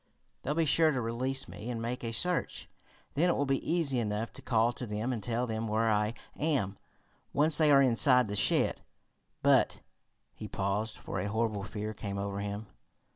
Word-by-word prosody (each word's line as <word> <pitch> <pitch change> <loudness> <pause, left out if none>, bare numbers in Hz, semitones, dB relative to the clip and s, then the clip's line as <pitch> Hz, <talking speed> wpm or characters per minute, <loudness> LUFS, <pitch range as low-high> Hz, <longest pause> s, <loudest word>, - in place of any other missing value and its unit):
"They'll 150 - -2
be 165 0 +2
sure 160 +2 +5
to 135 -4 0
release 130 +4 -1
me 115 - -8
and 120 -2 -3
make 120 +2 -4
a 115 - -2
search. 180 +9 -1 0.5
Then 175 +5 +2
it - - +2
will 145 - +1
be 135 -1 0
easy 155 -7 +2
enough 110 0 -2
to - - -8
call 115 0 +2
to 125 - -6
them 110 +4 -2
and 115 - -4
tell 120 +4 -1
them 110 -1 -3
where 110 +1 +1
I 105 +2 +1 0.2
am, 135 -11 -1 0.5
once 150 +3 +3
they 155 -1 +5
are 140 -1 +7
inside 125 0 +4
the 105 -1 -4
shed. - - +2 0.6
But - - +3 0.3
" - - -48
He 110 - -8
paused, 100 +3 -2
for 95 - -5
a 95 - -2
horrible 110 -1 -1
fear 105 +1 -5
came 100 -1 -5
over 100 0 -3
him. 100 +1 -4
115 Hz, 195 wpm, -31 LUFS, 105-135 Hz, 0.6 s, are